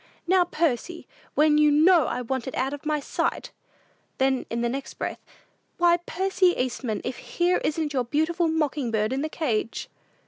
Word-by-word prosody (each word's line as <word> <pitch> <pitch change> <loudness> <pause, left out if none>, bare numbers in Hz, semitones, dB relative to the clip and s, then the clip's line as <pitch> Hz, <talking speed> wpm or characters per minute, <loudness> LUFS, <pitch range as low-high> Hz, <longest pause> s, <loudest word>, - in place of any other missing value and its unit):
"Now, 365 0 +4
Percy! 335 0 -2 0.3
When 300 0 +4
you 300 0 +5
know 315 0 +5
I 250 - -2
want 260 +1 -3
it 260 - -5
out 265 +2 -1
of 290 +1 -7
my 305 -1 +1
sight!" - - -2 0.7
Then, 265 -1 +1
in 235 +1 -2
the 240 - +1
next 270 +3 -5
breath, - - -5 0.5
"Why, 345 0 +4
Percy 380 -1 +2
Eastman, 250 -3 -2
if 250 - -4
here 355 +1 0
isn't 305 -1 -1
your 255 -3 0
beautiful 320 +6 +1
mocking 300 -5 0
bird 215 +1 0
in 270 - -1
the 310 - -2
cage!" 235 -9 -2
295 Hz, 175 wpm, -25 LUFS, 255-335 Hz, 0.7 s, you